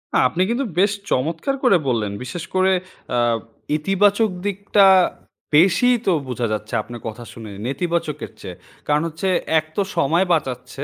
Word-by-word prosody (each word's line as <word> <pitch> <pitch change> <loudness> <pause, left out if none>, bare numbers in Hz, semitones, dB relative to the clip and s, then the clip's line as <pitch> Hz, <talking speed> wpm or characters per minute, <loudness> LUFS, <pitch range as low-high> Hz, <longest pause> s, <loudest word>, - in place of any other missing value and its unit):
আ - - +5
আপনি 170 +7 -2
কিন্তু 245 +4 0
বেশ 200 +2 +4 0.2
চমৎকার 165 - 0
করে 240 -8 +5
বললেন। 110 -5 0
বিশেষ 155 +6 -6
করে 190 0 +3 0.4
আ - - +2 0.6
ইতিবাচক 200 +6 +2 0.2
দিকটা 200 0 +3 0.7
বেশিই 195 +10 +5
তো 190 - +3 0.2
বোঝা 125 -2 -2
যাচ্ছে 110 +1 -5
আপনার 120 +2 -10
কথা 115 +2 -7
শুনে, 110 -2 -9 0.2
নেতিবাচকের 150 +1 -2
চেয়ে। 90 - -7 0.3
কারণ 150 0 +2
হচ্ছে 165 +4 -4 0.3
এক 155 - -7
তো - - +1 0.2
সময় 165 +7 +3
বাঁচাচ্ছে, 130 -3 -3
160 Hz, 150 wpm, -21 LUFS, 125-195 Hz, 0.7 s, আ